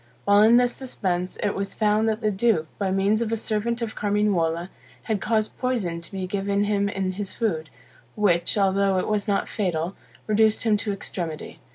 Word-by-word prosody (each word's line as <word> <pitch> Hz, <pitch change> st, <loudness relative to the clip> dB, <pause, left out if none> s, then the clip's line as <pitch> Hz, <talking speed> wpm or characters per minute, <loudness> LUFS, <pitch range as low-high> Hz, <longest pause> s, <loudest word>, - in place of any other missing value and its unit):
While 205 Hz, 0 st, +5 dB
in 225 Hz, +3 st, +7 dB
this 245 Hz, 0 st, +3 dB
suspense, 185 Hz, -8 st, -3 dB
it 205 Hz, -, +1 dB
was 195 Hz, 0 st, -4 dB
found 215 Hz, +1 st, +2 dB
that 220 Hz, +1 st, -2 dB
the 215 Hz, -2 st, +1 dB
duke, 200 Hz, -5 st, +2 dB
by 195 Hz, -2 st, 0 dB
means 195 Hz, +3 st, +2 dB
of 225 Hz, -1 st, -1 dB
a -, -, +2 dB
servant 230 Hz, +2 st, -1 dB
of 220 Hz, -, -4 dB
Carmignuola, 190 Hz, -5 st, 0 dB, 0.3 s
had 220 Hz, -3 st, -1 dB
caused 215 Hz, -1 st, -1 dB
poison 210 Hz, -10 st, -1 dB
to 170 Hz, -, -11 dB
be 190 Hz, -2 st, -3 dB
given 200 Hz, +1 st, 0 dB
him 200 Hz, -1 st, +1 dB
in 190 Hz, -2 st, -2 dB
his 195 Hz, 0 st, -5 dB
food, 165 Hz, -9 st, -1 dB, 0.5 s
which, 180 Hz, -3 st, +2 dB
although 195 Hz, -1 st, +2 dB
it 185 Hz, -, -1 dB
was 210 Hz, 0 st, -1 dB
not 200 Hz, -1 st, +1 dB
fatal, 180 Hz, -3 st, -2 dB, 0.3 s
reduced 215 Hz, 0 st, +3 dB
him 220 Hz, -2 st, +3 dB
to 205 Hz, 0 st, -2 dB
extremity. 170 Hz, -5 st, -5 dB
205 Hz, 190 wpm, -24 LUFS, 190-215 Hz, 0.5 s, in